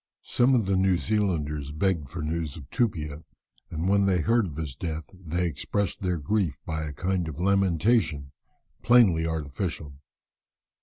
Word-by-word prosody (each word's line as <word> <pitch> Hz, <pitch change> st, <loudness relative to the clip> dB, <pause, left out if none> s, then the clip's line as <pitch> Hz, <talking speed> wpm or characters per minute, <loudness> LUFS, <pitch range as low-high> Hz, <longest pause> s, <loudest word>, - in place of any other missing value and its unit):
Some 125 Hz, +2 st, +3 dB
of 115 Hz, -5 st, +2 dB
the 95 Hz, 0 st, +1 dB
New 95 Hz, -1 st, +3 dB
Zealanders 80 Hz, -9 st, -1 dB
begged 80 Hz, -2 st, 0 dB
for 85 Hz, 0 st, -5 dB
news 80 Hz, -1 st, -3 dB
of 70 Hz, -5 st, -10 dB
Tupia, 80 Hz, -10 st, -1 dB, 0.5 s
and 85 Hz, +2 st, -3 dB
when 100 Hz, 0 st, +3 dB
they 90 Hz, -3 st, +2 dB
heard 115 Hz, +2 st, +2 dB
of 75 Hz, -, -8 dB
his 75 Hz, -5 st, -5 dB
death, 80 Hz, 0 st, -4 dB
they 90 Hz, -1 st, -2 dB
expressed 85 Hz, +5 st, -2 dB
their 90 Hz, -2 st, 0 dB
grief 80 Hz, -2 st, 0 dB
by 80 Hz, -3 st, -3 dB
a 75 Hz, -, -5 dB
kind 90 Hz, +3 st, -1 dB
of 80 Hz, 0 st, -6 dB
lamentation 90 Hz, -, +2 dB, 0.5 s
plainly 100 Hz, -10 st, +5 dB
artificial. 80 Hz, -1 st, -4 dB
85 Hz, 155 wpm, -27 LUFS, 75-100 Hz, 0.5 s, plainly